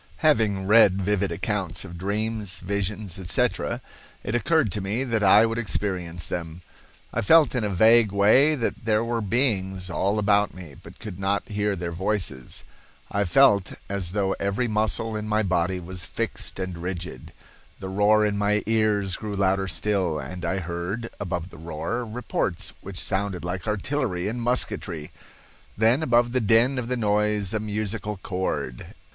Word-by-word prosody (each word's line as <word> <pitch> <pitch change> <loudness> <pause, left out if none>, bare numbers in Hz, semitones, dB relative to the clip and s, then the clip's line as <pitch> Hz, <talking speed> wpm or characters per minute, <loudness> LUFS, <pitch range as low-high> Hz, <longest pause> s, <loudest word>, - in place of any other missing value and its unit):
Having 110 -10 +3
read 100 -2 +6
vivid 100 -1 0
accounts 95 +1 -2
of 90 -2 -9
dreams, 105 +2 -2
visions, 100 -1 -3
etc., 90 -2 0 0.4
it 105 - -3
occurred 140 - +2
to 105 - -3
me 105 +7 -1
that 115 -5 0
I 105 +3 +7
would 115 +1 -1
experience 90 -6 -2
them. 85 0 -5 0.5
I 115 - 0
felt 155 +7 +5
in 125 -3 0
a 105 - 0
vague 110 +3 +5
way 110 +10 +5
that 115 -5 -3
there 110 0 +2
were 115 0 -1
beings 95 -5 0
all 100 +4 0
about 105 0 +2
me 90 -6 -10
but - - -14
could 100 -5 -8
not 100 +1 -1
hear 105 -1 0
their 85 -1 -4
voices. 90 -7 -2 0.5
I 100 0 +1
felt 100 -1 +4 0.2
as 95 -3 -2
though 100 -2 +1
every 100 +5 0
muscle 110 +1 0
in 105 0 -4
my 110 0 +1
body 90 -1 0
was 90 0 -5
fixed - - -4
and 95 -2 -4
rigid. 90 -5 -6 0.5
The 95 - -6
roar 105 +3 +3
in 105 -1 0
my 105 0 +1
ears 105 -4 +1
grew 105 -2 -5
louder 95 0 +1
still, 90 -1 0
and 85 +6 -7
I 95 +3 -1
heard, 90 +6 -4
above 90 -3 -3
the 85 - -12
roar, 85 +9 -3
reports 110 -6 -2
which 95 -1 -7
sounded 95 -3 -2
like 90 +3 -4
artillery 105 -3 -1
and 120 +3 -3
musketry. 95 -9 -1 0.7
Then 115 +7 +4
above 120 -4 +3
the 130 0 +1
din 115 +5 +3
of 120 - -4
the 125 0 -1
noise 105 -2 +1
a 110 - 0
musical 105 0 -3
chord. 90 -9 -4
100 Hz, 165 wpm, -25 LUFS, 95-110 Hz, 0.7 s, I